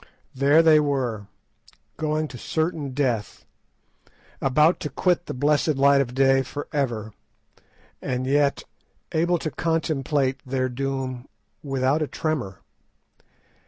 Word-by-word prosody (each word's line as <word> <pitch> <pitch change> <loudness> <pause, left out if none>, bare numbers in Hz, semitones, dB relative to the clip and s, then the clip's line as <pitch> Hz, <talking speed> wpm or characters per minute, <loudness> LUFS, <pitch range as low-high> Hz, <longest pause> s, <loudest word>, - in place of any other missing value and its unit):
There 140 +5 +4
they 155 -2 +6
were—going 145 +4 -4
to 125 - -9
certain 160 -1 -2
death, 125 -8 -2 1.0
about 150 +6 +3
to 150 - -4
quit 175 +5 0
the - - -4
blessed 150 +3 +2
light 140 0 +5
of 125 -2 -4
day 135 0 +4
for 145 +3 -6
ever, 115 -7 -2 0.9
and 130 0 -2
yet 140 +1 +2 0.5
able 170 +2 +2
to 155 -1 -4
contemplate 150 -4 0
their 130 0 -1
doom 130 0 -4 0.3
without 135 +1 0
a 155 - 0
tremor. 135 - -3
140 Hz, 115 wpm, -24 LUFS, 130-155 Hz, 1.0 s, they